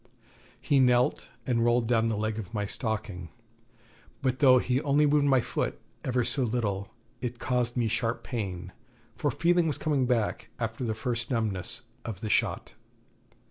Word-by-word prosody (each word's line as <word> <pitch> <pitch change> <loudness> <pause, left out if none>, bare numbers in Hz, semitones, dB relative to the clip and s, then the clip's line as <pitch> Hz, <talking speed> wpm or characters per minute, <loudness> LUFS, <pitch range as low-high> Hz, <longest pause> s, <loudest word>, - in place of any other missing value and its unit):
He 140 +2 +2
knelt, 125 -1 +3 0.2
and 115 -2 +1
rolled 120 0 +3
down 115 -1 +3
the 110 - -1
leg 110 +1 -1
of 110 +1 -7
my 105 -1 0
stocking; 105 -6 -3 0.9
but 130 -1 +1
though 130 -3 +7
he 125 +1 +1
only 145 +1 +3
moved 145 0 +3
my 135 -2 +4
foot - - -2 0.2
ever 125 -1 +1
so 135 - -1
little, 110 -5 -1 0.3
it 120 -1 -3
caused 125 0 -1
me 120 -2 +2
sharp 115 +1 -1
pain, 95 -6 -4 0.4
for 145 - 0
feeling 170 +5 +2
was 150 - -1
coming 145 -5 +1
back 115 -4 0
after 115 +1 -3
the 110 -2 -1
first 120 +1 -2
numbness 110 -2 -1 0.2
of 110 -4 -6
the 110 - -2
shot. - - +1
120 Hz, 165 wpm, -28 LUFS, 110-130 Hz, 0.9 s, though